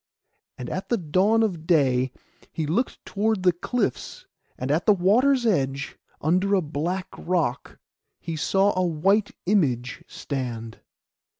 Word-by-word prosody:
And 125 - -6
at 185 - -5
the 235 - +2
dawn 190 +7 +2
of 170 -7 -2
day 130 -6 +3 0.4
he 160 - -3
looked 190 - -2
toward 210 -1 0
the 180 - +5
cliffs; 200 - -3 0.3
and 130 +2 -2
at 160 +4 0
the 210 - +7
water's 235 +8 +3
edge, 140 -8 0 0.2
under 185 +6 +2
a 190 - +2
black 170 +6 -3
rock, 165 -7 -2 0.4
he 165 -1 -5
saw 195 +6 +2
a 185 - +1
white 190 +5 +1
image 130 - 0
stand. 120 -5 -5
175 Hz, 135 wpm, -25 LUFS, 140-200 Hz, 0.4 s, the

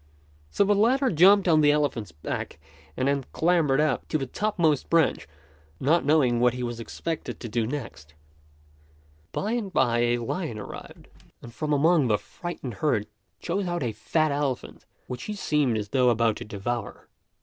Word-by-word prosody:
So 140 - +2
the 205 +1 +3
latter 255 +6 +3
jumped 190 +4 +6
on 160 -2 +5
the 145 - +5
elephant's 135 - -1
back 75 -1 -5 0.4
and 130 - 0
then 140 -1 +1
clambered 160 -5 +2
up 150 -4 0
to - - 0
the 135 - -3
topmost 165 -2 0
branch, 165 -3 +2 0.5
not 160 +6 +2
knowing 135 -5 +3
what 125 0 +3
he 125 - -4
was 120 -1 -4
expected 160 +8 -5
to 120 - -6
do 115 0 -1
next. 115 - -7 1.2
By 210 - -2
and 230 -5 -2
by 120 -7 +2
a 120 0 +2
lion 120 +2 -4
arrived, 105 - -10 0.4
and 115 - -10
from 155 +3 -3
among 150 0 +3
the 105 -2 +3
frightened 140 - -7
herd 110 -2 0 0.3
chose 185 +2 -2
out 175 -3 -2
a 120 - -1
fat 155 +8 0
elephant, 140 -3 -3 0.2
which 125 0 -6
he 210 - -4
seemed 150 - +1
as 105 -1 -4
though 125 0 +3
about 115 -2 +2
to - - -7
devour. 110 +3 -5
140 Hz, 170 wpm, -26 LUFS, 120-170 Hz, 1.2 s, jumped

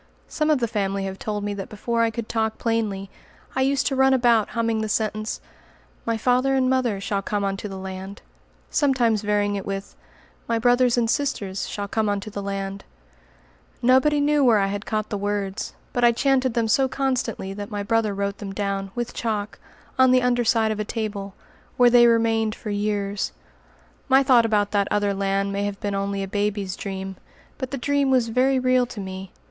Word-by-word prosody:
Some 305 0 -1
of 305 - +4
the 240 -2 0
family 200 -3 -1
have 190 0 -5
told 210 -1 -3
me 205 0 -2
that 195 -1 -6
before 230 +2 -1
I 230 - +3
could 225 0 -5
talk 220 -1 -1
plainly, 210 -4 -1 0.4
I 265 - +1
used 275 +1 +2
to 270 - 0
run 265 0 +4
about 235 -4 +3
humming 230 -1 +1
the 220 - -2
sentence 215 0 -1 0.7
"My 230 -1 +1
father 255 +4 +2
and 260 -1 +2
mother 255 -6 +1
Shall 200 0 -2
come 205 +1 -2
unto 195 +1 -2
the 195 -1 -7
land," 190 +1 -7 0.5
sometimes 245 -7 +2
varying 205 -1 +1
it 195 - -3
with, 195 0 -5 0.5
"My 230 - +1
brothers 245 +1 +3
and 235 -1 +2
sisters 225 -7 -1
Shall 205 -1 -4
come 215 +1 0
unto 205 +1 -3
the 200 - -5
land;" 195 0 -4 1.0
Nobody 265 +4 +4
knew 290 0 +3
where 235 -4 +5
I 200 - +2
had 205 0 -5
caught 215 -1 -2
the 205 - -2
words, 205 -1 -3 0.2
but 245 - 0
I 240 - +7
chanted 260 -1 +1
them 230 -1 +1
so 265 +5 +3
constantly 255 -7 -2
that 205 0 -6
my 205 -1 -3
brother 220 -1 +1
wrote 200 0 -2
them 195 -2 -6
down, 195 -1 -2
with 240 -1 -3
chalk, 210 -3 -3 0.4
on 260 0 +7
the 255 0 +4
under 245 -1 +2
side 225 -1 +2
of 215 - -3
a - - 0
table, 205 -3 -4 0.4
where 245 -1 +6
they 240 0 +7
remained 225 -1 +2
for 215 - -6
years. 205 -1 -1 0.8
My 270 +1 +6
thought 245 -3 +5
about 205 -2 +1
that 200 -1 +1
other 205 -1 +1
land 195 0 0
may 200 +1 -1
have 205 -1 -4
been 205 -1 -2
only 195 0 -2
a - - -4
baby's 205 -1 -1
dream; 190 -1 -5 0.4
but 260 -2 -3
the 275 - -4
dream 280 +2 +1
was 250 -3 +3
very 260 +3 +2
real 255 -1 +2
to 240 -3 -8
me. 190 -1 -7
215 Hz, 200 wpm, -24 LUFS, 200-245 Hz, 1.0 s, I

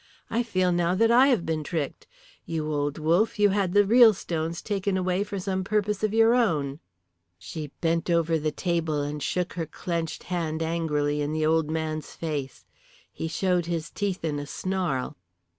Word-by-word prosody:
I 230 - +2
feel 185 -6 +1
now 175 +1 +1
that 225 +4 +3
I 250 +3 +7
have 240 -11 +2
been 160 -1 -1
tricked. 155 -3 -4 0.4
You 155 -2 -2
old 145 0 -1
wolf, 170 +9 +2
you 205 0 +5
had 195 -2 0
the 205 0 +5
real 230 0 +7
stones 165 -2 -3
taken 200 -2 -1
away 185 +1 0
for 205 -1 -5
some 190 0 -2
purpose 210 0 -1
of 215 - +2
your 225 +1 +5
own." 155 - +1 0.6
She 150 - -6
bent 165 +1 0
over 165 -1 +2
the 155 0 -1
table 160 -3 -1
and 145 +1 -4
shook 180 +4 -1
her 165 -3 -3
clenched 165 0 -4
hand 165 -3 -2
angrily 150 -3 0
in 145 +1 -2
the 155 0 0
old 160 -1 +2
man's 155 -1 -3
face. 145 -5 -4 0.5
He 160 - -4
showed 175 +1 0
his 165 -2 -3
teeth 195 -4 -2
in 150 -2 -1
a 145 - -6
snarl. 180 - -2
170 Hz, 180 wpm, -26 LUFS, 155-195 Hz, 0.6 s, I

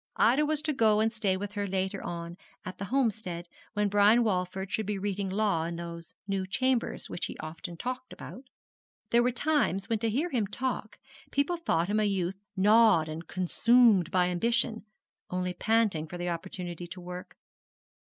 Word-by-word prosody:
Ida 275 +6 +4
was 305 -1 0
to 310 -1 0
go 220 -5 +4
and 220 +1 +2
stay 210 -4 0
with 205 +1 -5
her 205 -1 -2
later 190 +1 -2
on 170 0 -5 0.3
at 185 0 -7
the 200 - -3
Homestead, 215 -8 -1 0.3
when 210 -1 +1
Brian 205 +4 +5
Walford 190 -2 -1
should 215 -2 -1
be 210 -1 -1
reading 200 0 -2
law 195 -4 +1
in 170 0 -4
those 170 -1 -8
new 195 -1 -1
Chambers 255 +4 0
which - - -3
he - - -8
often 165 +2 -7
talked 255 +3 -5
about. 255 - -9 0.7
There 235 - +5
were 245 - +3
times 250 - 0
when 225 -2 +1
to 225 +1 0
hear 295 +11 -1
him 225 -6 0
talk 245 0 -3 0.3
people 285 +5 +1
thought 175 - +1
him 210 +2 +1
a - - +2
youth 195 -1 -1 0.2
gnawed 210 -4 +5
and 160 +1 -6
consumed 200 0 +4
by 180 -1 +2
ambition, 230 +4 0 0.4
only 180 0 -2
panting 210 -6 +1
for 175 - -7
the 175 0 -2
opportunity 175 0 -5
to 180 +2 -8
work. 180 0 -8
200 Hz, 180 wpm, -29 LUFS, 180-230 Hz, 0.7 s, Brian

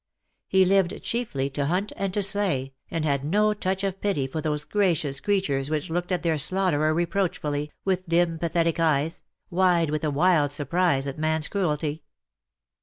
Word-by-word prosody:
He 190 0 +4
lived 190 -1 +2
chiefly 145 - -2
to 140 +1 -1
hunt 185 +6 -1
and 195 -1 -2
to 205 - +1
slay, 185 -10 0 0.2
and 165 -2 -2
had 140 -2 0
no 210 +8 +2
touch 190 -1 -2
of 195 -1 -3
pity 195 -10 0
for 145 +4 -4
those 150 -1 -1
gracious 160 -8 +1
creatures 150 -10 0
which 155 0 -2
looked 175 +2 -2
at 180 - -1
their 160 -3 +1
slaughterer 155 -1 +2
reproachfully, 160 -4 -1
with 185 -2 -1
dim 170 -1 +2
pathetic 165 0 0
eyes 160 -1 +1 0.2
— - - -61
wide 175 -3 +3
with 155 0 -2
a 155 - +1
wild 150 -1 +3
surprise 145 0 +1
at 140 +2 -5
man's 155 0 +1
cruelty. 155 -5 -1
165 Hz, 175 wpm, -25 LUFS, 150-185 Hz, 0.2 s, He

